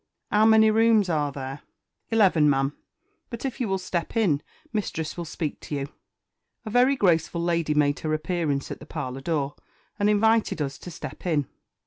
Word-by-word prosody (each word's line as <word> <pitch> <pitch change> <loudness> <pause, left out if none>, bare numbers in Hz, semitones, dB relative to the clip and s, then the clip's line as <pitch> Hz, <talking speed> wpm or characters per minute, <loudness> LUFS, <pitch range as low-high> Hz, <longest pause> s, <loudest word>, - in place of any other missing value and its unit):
"'Ow 210 +1 +4
many 220 0 +6
rooms 220 -3 +4
are 150 -3 0
there?" 135 +1 -6 0.5
"Eleven, 190 -9 +4
ma'am; 135 +1 +1 0.5
but 235 +2 -6
if 260 -1 -4
you 240 - 0
will 195 -1 0
step 185 +2 -3
in, 165 -11 +2 0.3
mistress 165 -7 -3
will 175 - -5
speak 155 -1 -4
to 150 - -5
you." 140 0 -3 0.8
A 215 - -5
very 250 +4 +4
graceful 170 - +2
lady 170 -3 0
made 145 -1 +2
her 155 - -3
appearance 155 -3 -1
at - - -6
the - - -12
parlour 130 +1 -5
door, 145 -2 -1 0.5
and 205 +1 +3
invited 220 -2 +3
us 140 -2 -3
to - - -9
step 170 +2 -8
in. 150 -5 +1
170 Hz, 175 wpm, -25 LUFS, 145-215 Hz, 0.8 s, many